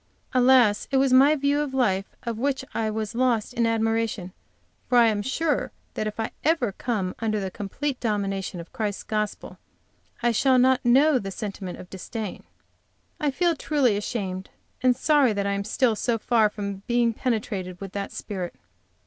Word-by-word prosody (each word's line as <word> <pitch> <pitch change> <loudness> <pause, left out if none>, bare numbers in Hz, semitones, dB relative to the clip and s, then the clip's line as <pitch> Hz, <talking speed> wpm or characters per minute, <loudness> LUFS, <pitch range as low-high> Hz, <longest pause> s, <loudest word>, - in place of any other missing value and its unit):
Alas, 250 -4 +4
it 275 - +2
was 265 -1 +3
my 275 +4 +7
view 285 0 +1
of 280 -3 -3
life 195 -7 0
of 230 -2 -4
which 265 +1 -1
I 220 -1 0
was 215 0 -3
lost 240 -2 +1
in 235 -2 +1
admiration, 225 -4 0 0.6
for 245 - +4
I 235 - +7
am 210 -2 0
sure 295 +7 -1 0.2
that 215 - -2
if 215 +1 -6
I 220 - -2
ever 295 -8 +2
come 195 -3 -2
under 215 -2 0
the 190 -1 -3
complete 255 +9 -4
dominion 195 -5 -2
of 170 - -10
Christ's 210 -3 -3
gospel 210 -1 -3 0.6
I 240 - +4
shall 260 +3 +3
not 255 +1 +4
know 265 +3 +5
the 195 - -5
Sentiment 195 -3 -6
of 180 - -10
disdain. 210 +2 -6 0.8
I 300 -3 +1
feel 340 +4 +1
truly 280 -7 +1
ashamed 195 -3 -4 0.3
and 255 -1 +4
sorry 275 -3 +3
that 200 -1 -1
I 200 - 0
am 200 0 -2
still 225 +2 +1
so 230 +2 0
far 225 -1 +3
from 200 -1 -5
being 240 -1 +2
penetrated 205 -7 -3
with 195 -2 -7
that 200 0 -4
spirit. 185 -4 -5
225 Hz, 175 wpm, -25 LUFS, 205-255 Hz, 0.8 s, my